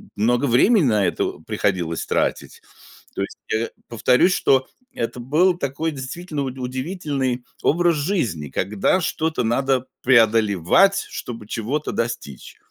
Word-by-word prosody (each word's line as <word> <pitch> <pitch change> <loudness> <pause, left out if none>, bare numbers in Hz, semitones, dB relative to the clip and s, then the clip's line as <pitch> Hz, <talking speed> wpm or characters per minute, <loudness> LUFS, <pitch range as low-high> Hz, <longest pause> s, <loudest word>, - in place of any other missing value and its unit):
много 120 +5 +2
времени 170 - +4
на 105 -5 +2
это - - -2
приходилось 95 -6 -1
тратить. - - -2 0.5
То - - -2
есть, - - -7 0.2
э, 110 +1 0 0.2
повторюсь, 125 - +3
что 130 -5 +2 0.3
это 245 - -4
был 165 +9 +2
такой 150 +2 -2
действительно 145 +3 -5
уд 130 -1 -5
удивительный 130 -1 -3 0.2
образ 170 +1 +3
жизни, 140 - -1
когда 100 - 0
что-то 160 -4 -1
надо 130 +2 +1 0.2
преодолевать, 115 - +4
чтобы 115 -3 -7
чего-то 125 +8 -3
достичь. 115 - -5
130 Hz, 125 wpm, -22 LUFS, 110-155 Hz, 0.5 s, времени